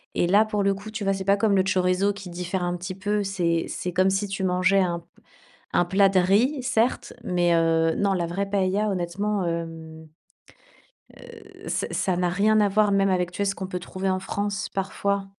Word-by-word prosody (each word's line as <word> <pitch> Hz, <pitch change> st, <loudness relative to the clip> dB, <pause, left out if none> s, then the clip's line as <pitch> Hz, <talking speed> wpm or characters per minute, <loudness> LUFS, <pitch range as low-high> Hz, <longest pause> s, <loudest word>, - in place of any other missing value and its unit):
et 175 Hz, -, +2 dB
là 205 Hz, +4 st, +5 dB
pour 210 Hz, -2 st, -1 dB
le 195 Hz, 0 st, +2 dB
coup, 200 Hz, +2 st, -9 dB
tu 215 Hz, -1 st, -5 dB
vois? 195 Hz, -, +1 dB
C'est 195 Hz, -1 st, -3 dB
pas 200 Hz, +1 st, +4 dB
comme 200 Hz, -1 st, +2 dB
le 190 Hz, -, +4 dB
chorizo 190 Hz, +1 st, +1 dB
qui 200 Hz, -2 st, -9 dB
diffère 180 Hz, +1 st, -3 dB
un 175 Hz, 0 st, -1 dB
petit 180 Hz, +1 st, -6 dB
peu, 205 Hz, +2 st, -1 dB
c'est 175 Hz, -4 st, 0 dB
c'est 180 Hz, -, -4 dB
comme 185 Hz, +2 st, +3 dB
si 195 Hz, +1 st, -1 dB
tu 195 Hz, -1 st, -2 dB
mangeais 185 Hz, +2 st, +2 dB
un 175 Hz, -2 st, 0 dB
p 170 Hz, -, -22 dB, 0.7 s
un -, -, +3 dB
plat 195 Hz, +3 st, +4 dB
de 190 Hz, -1 st, +2 dB
riz, 225 Hz, +10 st, +2 dB
certes, 250 Hz, -1 st, 0 dB
mais 175 Hz, -4 st, +2 dB
heu, 165 Hz, -1 st, +2 dB
non, 200 Hz, -1 st, +1 dB
la 175 Hz, -3 st, -1 dB
vraie 180 Hz, +4 st, -2 dB
paëlla, 200 Hz, +1 st, +1 dB
honnêtement, 195 Hz, +3 st, -2 dB
hem, 165 Hz, -1 st, -5 dB, 1.1 s
heu, -, -, -13 dB
ça -, -, -1 dB
ça 185 Hz, -2 st, 0 dB
n'a 180 Hz, 0 st, +1 dB
rien 210 Hz, +4 st, +3 dB
à 205 Hz, -, +3 dB
voir, 205 Hz, +1 st, +2 dB
même 195 Hz, 0 st, +3 dB
avec, 180 Hz, -1 st, 0 dB
tu -, -, -9 dB
sais, 200 Hz, -, +1 dB
ce 195 Hz, -, 0 dB
qu'on 190 Hz, -, -5 dB
peut 180 Hz, -1 st, -4 dB
trouver 190 Hz, +2 st, -4 dB
en 185 Hz, 0 st, -1 dB
France 200 Hz, +1 st, -3 dB
parfois. 195 Hz, +1 st, -2 dB
190 Hz, 220 wpm, -24 LUFS, 180-200 Hz, 1.1 s, là